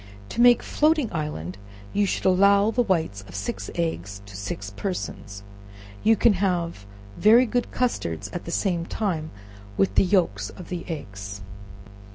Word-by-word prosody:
In 235 Hz, -, +2 dB
making 240 Hz, -1 st, +6 dB
floating 300 Hz, -7 st, +2 dB
island, 95 Hz, -, -4 dB, 0.3 s
you 205 Hz, -1 st, +2 dB
should -, -, -2 dB
allow 200 Hz, +3 st, +5 dB
the 245 Hz, -, +2 dB
whites 165 Hz, -, 0 dB
of 90 Hz, -, -11 dB
six 100 Hz, 0 st, -4 dB
eggs 100 Hz, -, -3 dB
to 100 Hz, -1 st, -12 dB
six 100 Hz, 0 st, -5 dB
persons. 100 Hz, -, -5 dB, 0.6 s
You 225 Hz, +1 st, +5 dB
can 225 Hz, +1 st, +4 dB
have 175 Hz, -, -1 dB, 0.3 s
very 230 Hz, +4 st, +7 dB
good 245 Hz, +1 st, -1 dB
custards 85 Hz, -, -1 dB
at 175 Hz, -, -5 dB
the 170 Hz, -, -5 dB
same 175 Hz, -2 st, 0 dB
time 165 Hz, -8 st, -2 dB, 0.5 s
with 95 Hz, 0 st, +2 dB
the -, -, +5 dB
yelks 170 Hz, -, +1 dB
of 180 Hz, -, -11 dB
the 175 Hz, -2 st, -4 dB
eggs. 100 Hz, -, -6 dB
170 Hz, 155 wpm, -25 LUFS, -, 0.6 s, very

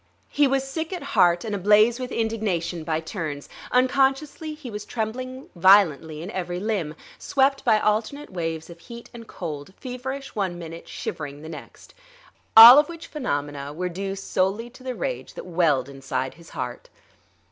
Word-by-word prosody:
He 290 Hz, -1 st, +4 dB
was 270 Hz, 0 st, +1 dB
sick 320 Hz, +5 st, -4 dB
at 360 Hz, -5 st, -5 dB
heart 175 Hz, +2 st, +4 dB
and 215 Hz, -, -3 dB
ablaze 210 Hz, +5 st, +4 dB
with 255 Hz, 0 st, -5 dB
indignation 200 Hz, -7 st, -2 dB
by 160 Hz, 0 st, -1 dB
turns. 160 Hz, -4 st, -5 dB, 0.2 s
Unconsciously 270 Hz, +4 st, +1 dB
he 290 Hz, -6 st, -9 dB
was 210 Hz, 0 st, -6 dB
trembling 255 Hz, +4 st, -5 dB
violently 165 Hz, -4 st, +4 dB
in 185 Hz, -, -6 dB
every 180 Hz, -2 st, -3 dB
limb; 190 Hz, -7 st, -2 dB, 0.2 s
swept 275 Hz, 0 st, +1 dB
by 215 Hz, -, +4 dB
alternate 220 Hz, +8 st, -1 dB
waves 165 Hz, -3 st, -4 dB
of 170 Hz, -, -13 dB
heat 235 Hz, +5 st, -11 dB
and 230 Hz, -1 st, -10 dB
cold, 155 Hz, +1 st, -7 dB
feverish 265 Hz, +2 st, -6 dB
one 190 Hz, -5 st, -2 dB
minute, 165 Hz, -1 st, -9 dB
shivering 145 Hz, -1 st, -6 dB
the 160 Hz, -, -8 dB
next. 160 Hz, -, -11 dB, 0.6 s
All 235 Hz, +5 st, +13 dB
of 295 Hz, -, +1 dB
which 335 Hz, -1 st, -8 dB
phenomena 145 Hz, -, -4 dB
were 180 Hz, +3 st, -3 dB
due 195 Hz, +2 st, -4 dB
solely 195 Hz, +4 st, -1 dB
to 255 Hz, -, -16 dB
the 255 Hz, -1 st, -5 dB
rage -, -, -4 dB
that -, -, -8 dB
welled 165 Hz, -7 st, +1 dB
inside 135 Hz, -1 st, -4 dB
his 170 Hz, 0 st, -16 dB
heart. -, -, -6 dB
205 Hz, 165 wpm, -24 LUFS, 165-255 Hz, 0.6 s, All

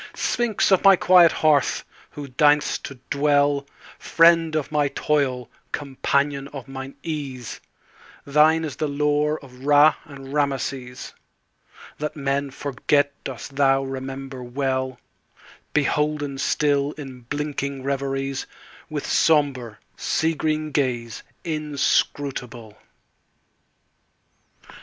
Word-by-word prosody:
Sphinx 235 Hz, -4 st, 0 dB
of 190 Hz, -, +4 dB
my 195 Hz, -1 st, +8 dB
quiet 180 Hz, -2 st, +6 dB
hearth! 150 Hz, -3 st, +2 dB, 0.2 s
who 145 Hz, -1 st, -8 dB
deign'st 150 Hz, +3 st, +3 dB
to 140 Hz, -, -7 dB, 0.2 s
dwellFriend 145 Hz, +3 st, +2 dB
of 155 Hz, -2 st, -2 dB
my 150 Hz, -1 st, +2 dB
toil, 135 Hz, -4 st, 0 dB, 0.2 s
companion 140 Hz, 0 st, -1 dB
of 140 Hz, -3 st, -9 dB
mine 135 Hz, 0 st, -8 dB
ease, 140 Hz, -7 st, -5 dB, 0.6 s
Thine 155 Hz, +3 st, +4 dB
is 145 Hz, -, -6 dB
the 155 Hz, -, -1 dB
lore 150 Hz, +1 st, +1 dB
of 125 Hz, 0 st, -15 dB
Ra 145 Hz, +1 st, +6 dB
and 135 Hz, -3 st, -10 dB
Rameses; 135 Hz, -3 st, -2 dB, 0.9 s
That 150 Hz, 0 st, -3 dB
men 140 Hz, -1 st, -1 dB
forget 145 Hz, +1 st, 0 dB
dost 135 Hz, +1 st, -7 dB
thou 135 Hz, -1 st, +3 dB
remember 135 Hz, 0 st, -6 dB
well, 130 Hz, 0 st, -2 dB, 0.7 s
Beholden 150 Hz, -1 st, 0 dB
still 145 Hz, 0 st, +1 dB
in 135 Hz, -4 st, -9 dB
blinking 140 Hz, +1 st, -4 dB
reveriesWith 135 Hz, +2 st, -4 dB
sombre, 140 Hz, -8 st, +2 dB, 0.2 s
sea 160 Hz, +1 st, 0 dB
green 155 Hz, 0 st, -1 dB
gaze 120 Hz, -5 st, -1 dB, 0.2 s
inscrutable. 140 Hz, -6 st, -1 dB
140 Hz, 100 wpm, -23 LUFS, 135-150 Hz, 0.9 s, my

